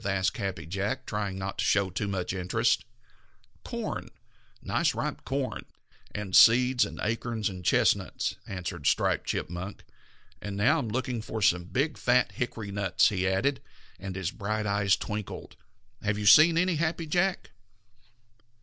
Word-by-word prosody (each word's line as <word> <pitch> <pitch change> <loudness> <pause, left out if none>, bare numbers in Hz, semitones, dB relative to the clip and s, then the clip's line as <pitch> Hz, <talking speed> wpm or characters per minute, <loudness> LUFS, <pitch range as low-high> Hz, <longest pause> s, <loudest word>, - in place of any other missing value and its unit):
asked 100 +1 0
Happy 95 -6 -4
Jack, 100 +9 -3
trying 100 -2 -3
not 95 0 -5
to - - +1
show 100 -2 +2
too 100 - -2
much 95 -2 -2
interest. 95 +7 +1 0.8
"Corn, - - -5 0.5
nice - - +1
ripe - - -3
yellow 135 +1 0
corn, - - -8 0.5
and 105 -3 -3
seeds 125 +2 +6
and - - -9
acorns 115 0 -1
and 90 -2 -8
chestnuts," - - +1
answered 90 -3 -4
Striped - - +1
Chipmunk. 90 +5 -4 0.6
"And 100 -1 -5
now 135 +11 +3
I'm 115 - -3
looking 125 0 -2
for 110 0 -5
some 90 -4 +2
big, 140 - -1
fat 125 0 +3
hickory 115 -4 -4
nuts," 100 -2 +2
he 95 -2 -1
added, 130 +9 0 0.4
and 95 -1 -6
his 95 -1 -2
bright 105 +1 -3
eyes 100 -1 +2
twinkled. 105 -1 -6 0.5
"Have 105 0 -1
you 105 - -3
seen 160 - +8
any, 180 -1 +2
Happy 165 +1 -1
Jack?" 175 +4 0
105 Hz, 150 wpm, -28 LUFS, 95-125 Hz, 0.8 s, seen